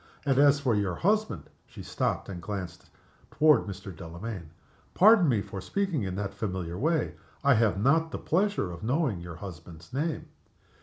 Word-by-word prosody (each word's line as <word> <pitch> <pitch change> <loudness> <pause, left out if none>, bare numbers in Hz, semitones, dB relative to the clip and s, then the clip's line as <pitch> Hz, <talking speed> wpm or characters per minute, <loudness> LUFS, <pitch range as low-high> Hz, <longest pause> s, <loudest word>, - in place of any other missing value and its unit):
And 135 -2 +2
as 145 0 +6
for 130 -4 +1
your 100 -4 0
husband 215 +4 0
" - - -40
She - - -10
stopped - - -2
and 90 -3 -7
glanced 90 -2 -6 0.4
toward 150 -5 +4
Mr. 95 -1 -7
Delamayn. 85 +2 -7 0.5
"Pardon 200 -4 +6
me 110 -6 +1
for 95 - -7
speaking 190 - -1
in 95 -2 -3
that 100 0 -3
familiar 95 -5 -4
way. 155 - 0 0.3
I 140 -1 +6
have 110 -4 +2
not 160 +8 +3
the - - -5
pleasure 185 - 0
of 85 - -9
knowing 125 - 0
your 85 -1 -8
husband's 85 +2 -10
name." 155 +4 -2
110 Hz, 170 wpm, -28 LUFS, 90-155 Hz, 0.5 s, as